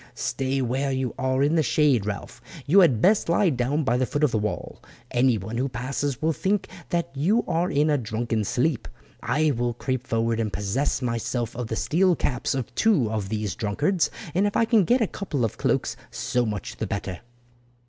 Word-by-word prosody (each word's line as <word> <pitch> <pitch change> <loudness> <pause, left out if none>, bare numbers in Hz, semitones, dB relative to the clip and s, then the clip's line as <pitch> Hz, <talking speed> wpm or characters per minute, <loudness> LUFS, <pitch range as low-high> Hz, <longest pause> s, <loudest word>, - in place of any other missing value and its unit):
"Stay 135 0 -1
where 135 +3 -1
you 130 -3 -1
are 130 +1 +1
in 145 +2 +2
the 165 - +4
shade, 130 -4 +2
Ralph. 100 -1 -5 0.2
You 175 +8 +5
had 135 - +4
best 200 -1 +4
lie 170 +1 +3
down 135 +4 0
by 125 -2 +1
the 130 0 0
foot 145 0 -1
of 150 - +4
the 110 - +1
wall. 105 0 -4 0.3
Anyone 115 -4 +1
who 135 +3 0
passes 130 +2 -3
will 160 +1 +2
think 195 +5 0 0.2
that 170 -4 -1
you 180 +12 +2
are 170 +2 +1
in 145 +2 +2
a 145 - +2
drunken 115 -1 -2
sleep. 130 +6 0 0.3
I 155 0 +1
will 120 -2 -1
creep 130 +1 -3
forward 115 0 0
and 110 -2 -1
possess 105 +8 -1
myself 115 0 -2
of 120 -1 -4
the 110 - -3
steel 180 +8 +2
caps 125 -3 -1
of 130 -3 -4
two 165 - +2
of 105 -3 -2
these 105 -3 -2
drunkards, 150 - 0 0.2
and 195 +4 +2
if 205 - -1
I 230 - +4
can 225 -4 +4
get 245 +5 +3
a 220 - +3
couple 145 - -2
of 110 - -5
cloaks - - 0
so 125 -1 -1
much 105 -3 -5
the - - -3
better." 95 -2 -4
130 Hz, 200 wpm, -25 LUFS, 115-155 Hz, 0.3 s, You